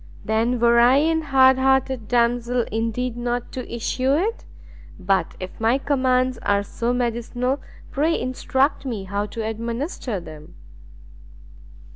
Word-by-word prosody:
"Then 230 +3 +1
were 235 0 +5
I 245 +2 +6
an 320 +2 +2
hard 265 -3 +4
hearted 265 -3 +1
damsel 240 0 +1
indeed 230 +2 -2
not 240 0 -3
to 255 - -7
issue 255 +3 0
it! 420 +9 -1 0.5
but 190 0 0
if 185 0 -8
my 230 +3 +3
commands 255 -3 +1
are 200 0 +1
so 235 +4 -2
medicinal, 245 +2 -1 0.3
pray 315 +4 +1
instruct 260 +2 0
me 230 -7 -4
how 200 +2 -3
to 220 +1 -5
administer 230 - -3
them." 155 -3 -12
245 Hz, 130 wpm, -22 LUFS, 225-260 Hz, 0.5 s, I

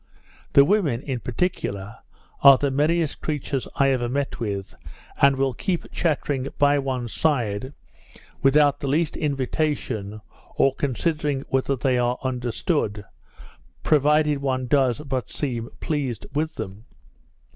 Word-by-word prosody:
The 140 - +7
women, 150 - +1
in 130 -4 -3
particular, 110 - -3 0.4
are 140 -1 +9
the 140 +1 0
merriest 155 +3 +1
creatures 145 -3 -2
I 135 -1 +3
ever 120 -2 0
met 140 +2 -2
with, 100 -4 -4 0.5
and 140 0 +6
will 135 -1 0
keep 175 +7 -3
chattering 145 -5 -1
by 145 0 +4
one's 130 -4 -3
side, 130 -5 0 0.7
without 145 +1 +4
the 140 - -4
least 155 +3 +1
invitation, 135 -7 -2 0.4
or 135 - +3
considering 145 +1 -1
whether 135 +1 +1
they 125 0 +1
are 120 +1 +1
understood, 125 - -1 0.8
provided 150 0 +3
one 130 -2 -1
does 130 -1 +2
but 130 -6 -3
seem 120 -5 -3
pleased 135 -8 -2
with 155 +2 -1
them. 100 +4 -7
135 Hz, 125 wpm, -24 LUFS, 125-150 Hz, 0.8 s, are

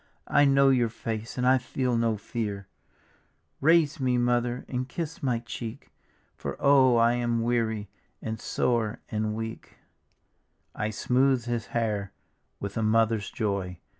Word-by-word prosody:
I 145 - +4
know 140 0 +5
your 125 -3 +3
face 115 +1 -5
and 125 - 0
I 130 +1 +5
feel 125 0 -1
no 115 -2 +1
fear; 100 -2 -4 0.9
Raise 160 0 +4
me. 125 -2 +1
Mother, 120 0 0
and 130 0 -3
kiss 165 -2 -5
my 125 -4 +1
cheek. 115 +1 -7 0.4
For - - -5
oh 135 -3 +5
I 115 +1 +4
am 120 -1 0
weary 110 -3 0 0.3
and 110 0 -5
sore 115 -1 0
and 110 -1 -1
weaL" 110 0 -4 1.1
I 110 - -2
smoothed 125 +3 +2
his 120 -1 -2
hair 105 -4 -2 0.5
with 100 +1 -5
a - - +1
mother's 110 -1 +2
joy. 100 -5 -2
120 Hz, 140 wpm, -27 LUFS, 110-125 Hz, 1.1 s, know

